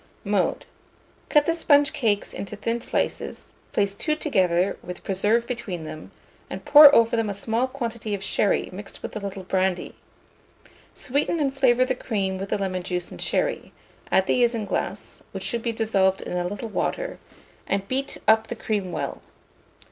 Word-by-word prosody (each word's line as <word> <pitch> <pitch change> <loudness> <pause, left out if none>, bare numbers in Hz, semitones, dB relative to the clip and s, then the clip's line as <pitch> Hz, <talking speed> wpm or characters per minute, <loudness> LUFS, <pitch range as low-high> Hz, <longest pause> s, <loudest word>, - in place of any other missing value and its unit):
Mode. - - 0 0.6
Cut 295 -2 +4
the 330 - +2
sponge 290 -3 +4
cakes 225 -9 0
into 200 +1 -6
thin 230 +3 -2
slices; - - -3 0.2
place 200 -1 +1
two 305 +9 -1
together, 190 - +1
with 180 0 -8
preserve 210 +5 +1
between 215 -9 -5
them, 155 0 -8 0.4
and - - -7
pour 295 -1 +10
over 230 0 +4
them 225 -2 0
a 200 - -2
small 225 +5 0
quantity 235 -5 -4
of 195 - -7
sherry 200 - +1
mixed 200 +2 -8
with - - -6
a - - -2
little 195 -1 -6
brandy. 185 0 -1 1.0
Sweeten 285 +5 -1
and 275 -2 0
flavour 255 -2 +4
the 260 - 0
cream 195 -6 -2
with 195 +1 -5
the - - 0
lemon 190 -2 -2
juice 180 -1 -3
and - - -9
sherry; - - -1 0.4
add 190 - +4
the 245 - +2
isinglass, 230 -3 -2
which - - -4
should 235 -2 -1
be 235 - -1
dissolved 195 -4 +1
in - - -5
a 175 0 0
little 205 +4 -5
water, - - -2 0.5
and 195 0 -1
beat 270 +3 -2
up 220 0 +5
the 235 - -5
cream 205 -5 -2
well. - - -4
220 Hz, 170 wpm, -24 LUFS, 190-250 Hz, 1.0 s, pour